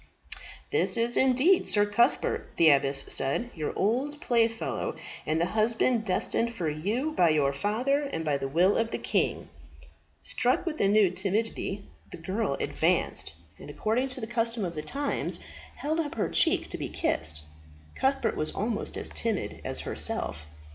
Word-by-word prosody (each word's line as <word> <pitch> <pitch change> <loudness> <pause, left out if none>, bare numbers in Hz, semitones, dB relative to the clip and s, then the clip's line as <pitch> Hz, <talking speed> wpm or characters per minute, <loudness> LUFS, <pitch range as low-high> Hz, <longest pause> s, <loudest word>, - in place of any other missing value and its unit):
"This - - +1
is 235 +1 +1
indeed 265 +8 +4
Sir 205 -1 +4
Cuthbert," 205 +3 +1
the 165 -2 +7
abbess 135 0 +2
said, 140 - -1
"your 155 -3 -3
old 260 +9 0
playfellow, 230 -3 0 0.3
and 155 +1 +1
the 170 - +2
husband 225 +1 +2
destined 230 +4 0
for 175 -7 -2
you 205 - -1
by 175 - +3
your 145 -3 +2
father 245 - 0
and 160 0 -3
by 145 -2 0
the 135 - -2
will 175 +8 +3
of 225 0 0
the - - -3
king." - - -1 0.8
Struck - - 0
with 315 -3 -3
a 195 - +4
new 205 -2 +4
timidity, 200 +1 -2 0.3
the - - -7
girl 190 +7 -2
advanced, - - 0 0.3
and, - - -10
according 230 +5 0
to 260 0 -3
the 220 - -4
custom 230 -2 -1
of 170 - -4
the 155 - -4
times, 280 - +1 0.4
held 310 +3 -2
up 300 -3 -2
her 215 - -1
cheek - - +3
to - - -5
be - - -4
kissed. 80 -1 0 0.5
Cuthbert 270 +1 0
was 155 - 0
almost 220 +1 -2
as - - -1
timid 225 -4 -2
as - - -1
herself. 75 +1 -1
215 Hz, 165 wpm, -28 LUFS, 165-245 Hz, 0.8 s, the